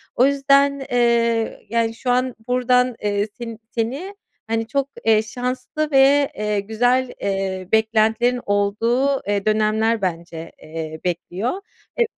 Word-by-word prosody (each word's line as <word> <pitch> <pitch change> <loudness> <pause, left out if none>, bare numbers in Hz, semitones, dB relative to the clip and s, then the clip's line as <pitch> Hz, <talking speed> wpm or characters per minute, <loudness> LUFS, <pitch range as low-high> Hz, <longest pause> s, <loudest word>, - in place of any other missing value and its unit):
O 250 - +5
yüzden, 280 0 +3
eee, 235 -2 +1
yani, 230 0 0
şu 250 +2 -4
an 255 0 +1
buradan, 250 0 +2
eee, 205 0 0
sen 230 -2 -7
seni, 270 - -3 0.3
hani, 225 0 -1
çok, 275 +3 -1 0.2
eee, 220 -1 +5
şanslı 250 +6 -3
ve, 275 +1 +5
eee, 210 -1 -1
güzel, 245 +5 +1
eee, 195 -2 -2
beklentilerin 220 +2 +2
olduğu, 230 +7 +1
eee, 205 -1 0
dönemler 215 +1 +2
bence, 170 -2 -4
eee, 160 0 -6
bekliyor. 185 - -3 0.4
E - - +6
230 Hz, 130 wpm, -21 LUFS, 210-255 Hz, 0.4 s, E